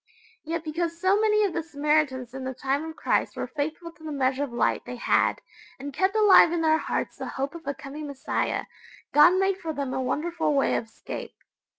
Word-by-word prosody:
Yet 330 +1 -3
because 335 +1 -3
so 380 +3 +3
many 425 -1 +3
of 395 -4 0
the 340 - -1
Samaritans 295 -5 0
in 265 0 -6
the 260 0 -4
time 275 +4 -1
of 320 - -9
Christ - - 0
were - - -3
faithful 315 +3 -4
to 330 - -20
the 310 - -5
measure 270 -1 0
of 280 - -5
light 240 - 0
they 250 - -7
had, 240 - +1 0.4
and 280 +1 -7
kept 380 +8 +1
alive 415 -6 +7
in 340 -1 0
their 315 0 +3
hearts - - -3
the - - -5
hope 275 +1 -3
of 335 -4 -11
a 280 - -1
coming 295 +2 -8
Messiah, 280 -1 -2 0.5
God 300 +5 +7
made 385 0 +1
for 325 -4 -4
them 280 -3 -3
a 260 - -1
wonderful 320 +3 -1
way 275 - +2
of - - 0
escape. 225 - -8
305 Hz, 215 wpm, -26 LUFS, 275-340 Hz, 0.5 s, alive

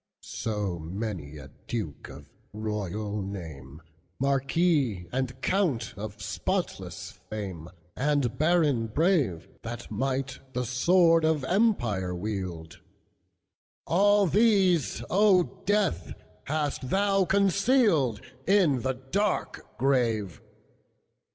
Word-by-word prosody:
So 105 -6 -3
many 85 -3 -5
a 70 -2 -11 0.2
duke 105 -11 -4
of 70 +1 -11 0.3
royal 105 -1 -3
name, 80 -7 -8 0.3
Marquis 135 - +1
and 130 0 -2
count 155 - 0
of 105 0 -7
spotless 100 - -3 0.2
fame, 95 -6 -6 0.3
And 140 -3 +1
baron 150 -6 +2
brave, 140 - +1
That 120 0 -7
might 130 +4 -2
the 125 -1 -1
sword 165 +7 +4
of 160 -3 +2
empire 120 - +1
wield, 90 -3 -5 1.1
All 205 +3 +4
these, 190 - +3
O 195 -2 +5 0.2
Death, 205 - 0 0.3
hast 145 -3 -2
thou 195 +1 +2
concealedIn 185 - +2
the 130 +1 0 0.2
dark 205 +1 -1
grave! 115 -8 0
130 Hz, 95 wpm, -27 LUFS, -, 1.1 s, O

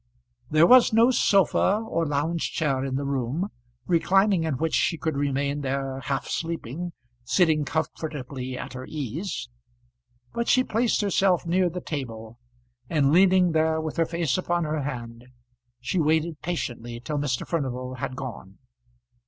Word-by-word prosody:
There 155 +2 +5
was 250 +6 +7
no 230 +3 +5
sofa 195 - +3
or 165 -5 0
lounging 150 +4 0
chair 140 -5 -1
in 135 -1 -2
the 140 +1 -2
room, 140 - -1 0.4
reclining 190 +1 +3
in 155 -4 -1
which 160 +3 -1
she 165 - +2
could 160 -1 -2
remain 140 0 -1
there 135 -1 -2
half 135 +1 -2
sleeping, 165 +1 -4 0.3
sitting 155 +2 +2
comfortably 140 -4 -4
at - - -7
her 130 0 -7
ease; 155 - -4 0.9
but 235 0 -2
she 255 - +4
placed 230 -1 +1
herself 195 -3 +2
near 180 +1 +2
the 180 +2 -6
table, 115 -7 -6 0.5
and 145 -4 +2
leaning 185 0 +5
there 160 0 +2
with 155 -1 -4
her 165 - +3
face 165 -3 0
upon 175 -1 0
her 155 -1 -1
hand, 120 -3 -6 0.5
she 125 +9 -1
waited 160 0 +1
patiently 120 -8 -4
till 145 +4 -3
Mr. 135 -4 -1
Furnival 130 -5 -3
had 130 0 -4
gone. 115 -8 -8
155 Hz, 150 wpm, -25 LUFS, 130-175 Hz, 0.9 s, was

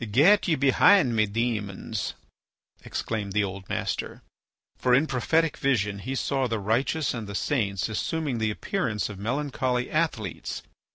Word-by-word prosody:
"Get 175 - +5
ye 165 - +3
behind 140 0 +5
me, 110 -1 +3
demons," 105 -2 -2 0.7
exclaimed 105 -3 -3
the 105 0 +2
old 95 -1 -6
master. - - -3 0.6
For 125 -1 +4
in 140 +5 +4
prophetic 160 +4 +1
vision 105 -7 0
he 130 +7 -4
saw 135 -1 0
the 115 -1 -1
righteous 120 +8 0
and 115 -4 -5
the 100 - -6
saints 100 -7 0
assuming 135 +4 -2
the 110 -1 +1
appearance 110 - -2
of 100 -2 -8
melancholy 125 +1 -1
athletes. 140 - -2
120 Hz, 145 wpm, -26 LUFS, 105-140 Hz, 0.7 s, Get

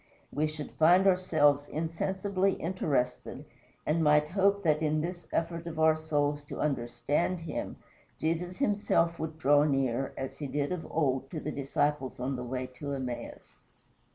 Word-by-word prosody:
we 155 +1 +1
should 155 -1 -7
find 175 +4 +5
ourselves 155 -6 +3
insensibly 190 +4 -1
interested, 155 -8 -2 0.4
and 160 +2 +1
might 150 0 +4
hope 200 +2 +2
that 155 -2 +2
in 155 0 +1
this 175 +2 -4
effort 170 0 -2
of 165 -1 -6
our 160 0 +5
souls 145 -2 0
to 145 - -8
understand 145 +6 0
him, 165 - -4 0.4
Jesus 170 +3 -2
himself 200 -8 +1
would 160 0 -4
draw 145 -1 +4
near, 135 -3 0
as 135 - -5
he 145 - -3
did 145 +3 -1
of 180 -3 -3
old 135 -4 0
to 160 - -4
the 150 - -4
disciples 140 -1 -1
on 130 +2 -2
the 125 - -4
way 130 +1 -3
to 140 -1 -3
Emmaus. 130 -3 -6
155 Hz, 155 wpm, -30 LUFS, 145-170 Hz, 0.4 s, find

